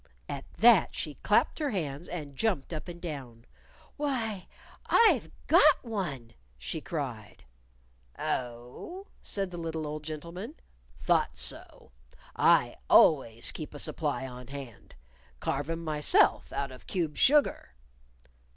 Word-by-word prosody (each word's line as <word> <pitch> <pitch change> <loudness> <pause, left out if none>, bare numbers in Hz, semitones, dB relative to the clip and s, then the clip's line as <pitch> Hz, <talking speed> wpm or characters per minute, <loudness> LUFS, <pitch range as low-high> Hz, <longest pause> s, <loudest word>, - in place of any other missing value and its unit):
At - - -7
that - - +5
she - - -4
clapped - - +2
her 300 -2 0
hands 160 - -3
and 150 -5 -6
jumped 175 -5 -1
up 155 - -5
and 175 -1 -8
down. 130 -9 -7 0.5
"Why, 235 -10 -2 0.4
I've 310 - +4 0.2
got 305 -2 +6
one!" 175 - -4 0.2
she 60 +1 -4
cried. - - -5 0.7
"Oh?" 125 - -4 0.2
said 195 -2 -3
the 175 - -6
little 160 -1 -3
old 150 0 -5
gentleman. 170 - -7 0.4
"Thought - - +1
so. - - -4 0.4
I - - +4
always 115 -7 +5
keep 150 -1 -7
a - - -5
supply 145 -3 -1
on 125 -1 -9
hand. 135 -4 -10 0.4
Carve 140 +3 -2
'em 165 0 -3
myself, 150 -2 +3
out 140 -1 -3
of 130 - -13
cube 165 -5 -2
sugar." 280 - +3
155 Hz, 125 wpm, -29 LUFS, 135-195 Hz, 0.7 s, got